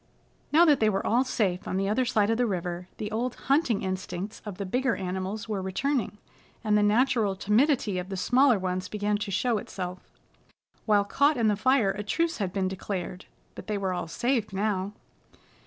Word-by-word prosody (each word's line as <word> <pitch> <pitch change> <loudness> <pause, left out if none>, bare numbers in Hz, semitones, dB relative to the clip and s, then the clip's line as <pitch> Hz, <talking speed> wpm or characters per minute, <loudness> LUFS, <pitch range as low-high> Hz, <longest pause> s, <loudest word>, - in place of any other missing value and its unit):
Now 330 +3 +6
that 295 -5 +5
they 215 - +4
were 195 -2 -1
all 240 +4 +3
safe 200 -8 -1
on 185 - -1
the 195 0 0
other 220 +5 +1
side 220 -3 +2
of 225 - +1
the 245 - +3
river, 180 -2 -3
the 210 0 -4
old 240 +3 -2
hunting 270 -6 +1
instincts 185 +2 -4
of 200 -3 -6
the 200 - -4
bigger 250 +5 0
animals 190 +3 -4
were 210 -3 -2
returning, 210 +3 -1 0.5
and 210 -1 +2
the 210 - +4
natural 215 -1 +2
timidity 210 0 +2
of 180 +1 -6
the 195 - -4
smaller 255 +5 +4
ones 185 0 -2
began 210 0 0
to 205 0 -4
show 220 +4 +1
itself. 180 -2 -6 0.9
While 205 -2 +4
caught 285 +7 +2
in 225 -2 +3
the 210 - +2
fire 220 -1 +3
a 200 +1 -5
truce 330 +11 -1
had 195 -3 -1
been 190 -1 0
declared, 185 -1 -5 0.3
but - - -10
they 210 -1 -1
were 190 -2 -1
all 175 -2 -3
safe 235 +4 -1
now. 200 0 -1
210 Hz, 195 wpm, -27 LUFS, 190-240 Hz, 0.9 s, Now